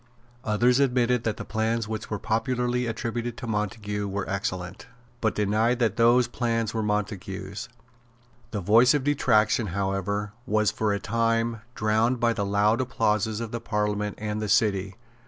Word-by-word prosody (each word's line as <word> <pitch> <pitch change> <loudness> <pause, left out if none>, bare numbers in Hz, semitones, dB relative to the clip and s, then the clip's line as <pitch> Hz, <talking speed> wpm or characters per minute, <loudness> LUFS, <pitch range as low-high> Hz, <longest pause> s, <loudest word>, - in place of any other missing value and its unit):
Others 120 +4 +3
admitted 125 -3 +2
that 110 - -1
the - - -6
plans 110 0 -1
which 110 -1 -5
were 105 - -2
popularly 125 +3 -1
attributed 115 +1 -3
to 125 - -6
Montague 105 -1 -2
were 100 0 -3
excellent, 95 -1 -4 0.3
but 110 - +1
denied 110 +4 +2
that 115 -4 +1
those 120 +1 +4
plans 115 -2 -1
were 110 - -1
Montague's. 100 -1 -3 0.8
The 105 - -3
voice 115 - +5
of 145 - 0
detraction, 120 -6 +2
however, 100 +2 -2 0.2
was 110 -2 +2
for 105 0 0
a 100 - 0
time 115 +1 0
drowned 110 +3 +1
by 120 -1 +2
the 105 - -2
loud 105 +4 +2
applauses 110 -3 0
of 115 -2 -5
the 115 - -4
Parliament 105 -1 -1
and 105 0 -3
the 105 - -3
City. 100 -3 +2
110 Hz, 155 wpm, -26 LUFS, 105-115 Hz, 0.8 s, voice